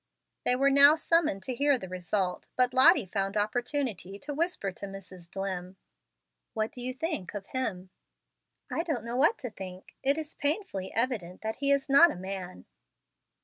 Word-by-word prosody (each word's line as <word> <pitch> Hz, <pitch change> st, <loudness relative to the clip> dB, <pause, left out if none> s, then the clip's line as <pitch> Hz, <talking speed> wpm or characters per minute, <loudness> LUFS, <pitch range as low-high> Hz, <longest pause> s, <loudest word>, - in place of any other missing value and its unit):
They 250 Hz, -, +4 dB
were 275 Hz, +2 st, +3 dB
now 280 Hz, +2 st, +8 dB
summoned 320 Hz, -, +1 dB
to 260 Hz, -, -3 dB
hear 280 Hz, +2 st, +3 dB
the 190 Hz, -, -8 dB
result, 185 Hz, +1 st, -2 dB
but 250 Hz, 0 st, +2 dB
Lottie 265 Hz, -, +7 dB
found 195 Hz, +2 st, -2 dB
opportunity 225 Hz, -, -2 dB
to 290 Hz, +7 st, -6 dB
whisper 315 Hz, -, -1 dB
to 200 Hz, +2 st, -6 dB
Mrs. 185 Hz, -3 st, -11 dB
Dlimm, 190 Hz, -1 st, -5 dB, 0.8 s
"What 215 Hz, 0 st, -1 dB
do 250 Hz, -, -8 dB
you 250 Hz, +1 st, -2 dB
think 260 Hz, -, -4 dB
of 200 Hz, -1 st, -5 dB
him?" 190 Hz, -8 st, -3 dB, 0.8 s
"I -, -, 0 dB
don't 310 Hz, -9 st, -3 dB
know 235 Hz, +1 st, -4 dB
what 300 Hz, -, +3 dB
to 245 Hz, -4 st, -6 dB
think. 185 Hz, -2 st, -10 dB
It 275 Hz, +2 st, +2 dB
is 315 Hz, -1 st, -6 dB
painfully 285 Hz, -, -2 dB
evident 225 Hz, -7 st, -2 dB
that 220 Hz, 0 st, -4 dB
he 280 Hz, +1 st, +1 dB
is 280 Hz, 0 st, +2 dB
not 280 Hz, +5 st, +7 dB
a -, -, -5 dB
man." 185 Hz, -, -7 dB
235 Hz, 175 wpm, -29 LUFS, 190-280 Hz, 0.8 s, now